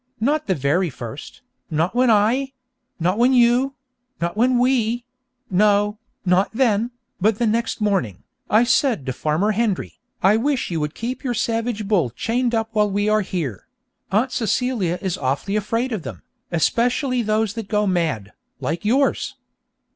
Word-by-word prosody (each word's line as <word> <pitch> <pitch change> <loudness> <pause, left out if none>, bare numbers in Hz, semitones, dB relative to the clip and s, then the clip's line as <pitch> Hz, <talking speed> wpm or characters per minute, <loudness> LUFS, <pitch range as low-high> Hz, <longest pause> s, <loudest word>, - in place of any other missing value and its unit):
Not 285 +7 0
the 190 - +2
very 150 +6 +1
first, 120 -4 -9 0.3
not 160 +3 0
when 250 0 +3
I 235 +6 +2 0.5
not 180 +5 +1
when 250 +2 +4
you 250 +2 +3 0.4
not 170 +2 -2
when 245 +3 +3
we 240 -1 +1 0.5
no, 205 +2 +3 0.3
not 180 +2 +3
then, 230 -2 +2 0.3
but 210 +2 +2
the 235 - +1
next 225 0 0
morning, 190 - 0 0.3
I 215 +3 +5
said 240 - +2
to 130 - -2
Farmer 155 +10 0
Hendry, 215 -3 -1 0.2
"I 200 +3 +5
wish 265 -2 0
you 165 - -1
would 150 0 -3
keep 245 +5 -4
your 245 -3 -1
savage 225 -2 -1
bull 185 - +2
chained 235 - -1
up 225 0 -1
while 210 -1 +2
we 205 +1 0
are 215 0 +3
here; 155 - -4 0.4
Aunt 230 +7 +2
Celia 225 -6 0
is 190 -3 -2
awfully 140 +9 -1
afraid 230 +5 -1
of 215 -5 -2
them, - - -8 0.3
especially 245 - +1
those 215 -1 0
that 225 -3 -6
go 210 0 +1
mad, 160 - -1 0.3
like 170 - -3
yours!" 265 +6 +1
215 Hz, 160 wpm, -21 LUFS, 180-240 Hz, 0.5 s, I